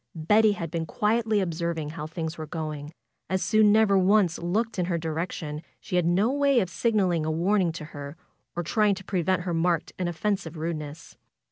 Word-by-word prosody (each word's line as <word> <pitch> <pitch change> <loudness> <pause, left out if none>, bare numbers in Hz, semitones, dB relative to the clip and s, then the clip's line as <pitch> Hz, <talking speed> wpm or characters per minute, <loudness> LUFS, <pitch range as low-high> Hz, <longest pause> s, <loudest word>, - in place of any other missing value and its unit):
Betty 210 +7 +4
had 170 -5 -5
been 165 -1 -2
quietly 215 +2 +1
observing 170 -3 -2
how 155 -1 -6
things 160 0 -4
were 155 -2 -7
going. 155 -1 -5 0.4
As 190 0 0
Sue 215 - +3
never 210 -1 +5
once 190 -2 +3
looked 205 +5 -1
in 180 - +1
her 170 -1 -1
direction 160 -1 -4 0.2
she - - -5
had 175 -2 +2
no 195 +8 +3
way 280 -2 +3
of 185 -5 -1
signaling 185 -4 +1
a 155 - -1
warning 175 +3 +2
to 160 -2 -7
her 145 +2 -7 0.4
or 175 - -2
trying 210 +4 +2
to 195 - -9
prevent 185 -1 0
her 175 -1 -2
marked 170 0 0
and 180 -1 0
offensive 175 -2 -2
rudeness. 155 -1 -5
175 Hz, 190 wpm, -26 LUFS, 160-205 Hz, 0.4 s, never